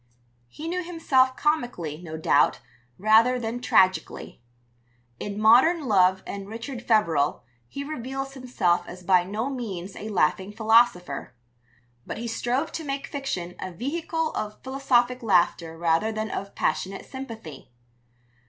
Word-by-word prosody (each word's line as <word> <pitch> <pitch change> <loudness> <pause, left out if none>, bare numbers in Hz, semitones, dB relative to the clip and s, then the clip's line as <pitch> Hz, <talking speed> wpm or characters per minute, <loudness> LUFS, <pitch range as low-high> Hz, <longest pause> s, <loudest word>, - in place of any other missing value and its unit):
He 305 - -8
knew 365 +2 -2
himself 270 -7 +2
comically, 240 - -1
no 160 -3 -7
doubt, 160 - +3 0.4
rather 220 +5 +5
than 235 +1 -4
tragically. 185 - +1 0.8
In 205 0 -5
Modern 260 +9 +5
Love 190 -3 +4
and 200 0 -6
Richard 235 +3 -6
Feverel 170 -12 +2 0.2
he 280 - -6
reveals 270 -1 -5
himself 195 -10 0
as 180 +1 -10
by 180 0 +4
no 210 +7 -3
means 200 -9 -5
a 215 - -6
laughing 190 +1 +1
philosopher; 220 - +2 0.7
but - - -5
he 235 +1 -4
strove 245 +6 -1
to 325 - -5
make 275 -1 -3
fiction 185 -11 -4
a 185 - -5
vehicle 320 - -2
of 210 0 -5
philosophic 255 -2 +1
laughter 175 -6 +1
rather 170 +6 +1
than 215 0 -3
of 200 +1 -5
passionate 195 +1 -2
sympathy. 230 - -9
225 Hz, 135 wpm, -25 LUFS, 185-265 Hz, 0.8 s, rather